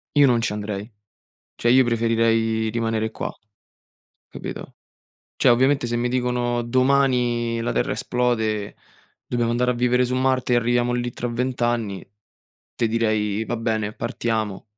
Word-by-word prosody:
io 145 -1 +7
non 120 -3 +3
ci 115 - -1
andrei. 105 +1 -5 0.6
Cioè 120 - 0
io 130 +2 +6
preferirei 115 -1 +1
rimanere 110 -1 -1
qua, - - -4 1.0
capito. - - -8 0.6
Cioè - - +3
ovviamente 130 +2 +3
se 120 - -2
mi 120 +1 0
dicono: 125 -1 0
"Domani 125 -2 +1
la 115 - -1
terra - - 0
esplode, 110 -4 -1 0.5
dobbiamo 120 -1 0
andare 125 +1 +1
a - - -1
vivere 125 +1 +2
su 125 +1 -1
Marte 130 -1 +1
e - - +5
arriviamo 120 +1 +1
lì 120 0 -2
tra 120 - -4
20 125 +1 -2
anni", 115 -5 -1 0.7
te 115 - 0
direi: 110 -2 0
"Va 120 - -2
bene, 110 -2 -2
partiamo". 110 -4 -3
120 Hz, 145 wpm, -23 LUFS, 110-125 Hz, 1.0 s, io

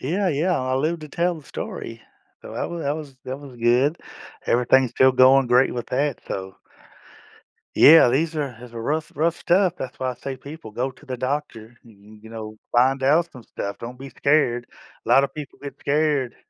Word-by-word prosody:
Yeah, 185 +8 0
yeah. 170 +3 +1
I 130 0 -1
lived 160 +4 -1
to 155 - -8
tell 175 +3 0
the 155 - -11
story - - -7 0.4
so - - -10
that - - -3
wa 170 - -5
that 145 0 -1
was 145 -4 -9
that 130 +2 -5
was 135 -4 -12
good, 125 +7 +2 0.5
everything's 125 +1 +3
still 130 0 +5
going 130 +1 +6
great 125 +2 +4
with 120 - -4
that 140 +1 -1
so 95 0 -5 1.2
Yeah, 160 -4 +8
these 155 +5 0
are 145 -3 -1
as 125 -1 -12
a 115 - -7
rough, 150 +5 -2
rough 165 +2 +1
stuff 180 0 +2
that's 130 - -7
why 130 -1 -1
I - - -11
say, 135 +1 -6
"People, 140 -4 -10
go 130 +4 -3
to 150 - -20
the 130 -1 -4
doctor, 120 -3 -4
y 115 - -17
y 105 +1 -16
you 110 - -12
know, 110 -1 -8
find 130 +2 +3
out 165 +5 +3
some 125 - -12
stuff 100 -2 -6
don't 125 +2 -8
be 135 0 -9
scared." 135 -5 +1 0.4
Lotta 140 +1 +4
people 145 -1 -10
get 140 -2 -7
scared 145 -3 0
135 Hz, 200 wpm, -23 LUFS, 125-150 Hz, 1.2 s, Yeah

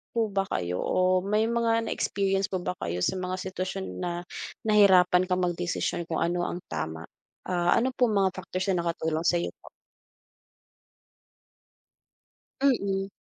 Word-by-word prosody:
po 220 -3 +1
ba 195 0 0
kayo 90 0 -2
o 185 0 +2
may 210 +2 +1
mga 230 -1 +2
na - - -3
experience 195 -1 0
po 185 - -1
ba 180 - -2
kayo 85 +1 -3
sa 190 - 0
mga 185 0 -2
sitwasyon 190 +1 -4
na 175 -1 -3 0.4
nahirapan 185 -3 +5
kang 180 0 +1
magdesisyon 175 0 -1
kung 160 - -2
ano 175 +1 0
ang 175 - -4
tama? 80 +1 -4 0.4
Ah, 175 -1 +2
ano 260 +3 +1
pong 235 -4 +2
mga 190 - +3
factors 185 +1 -4
na 175 -2 0
nakatulong 160 -1 -1
sa'yo 175 -1 +1
po? - - -14 2.9
Mm. 200 -8 +1
185 Hz, 145 wpm, -27 LUFS, 175-195 Hz, 2.9 s, nahirapan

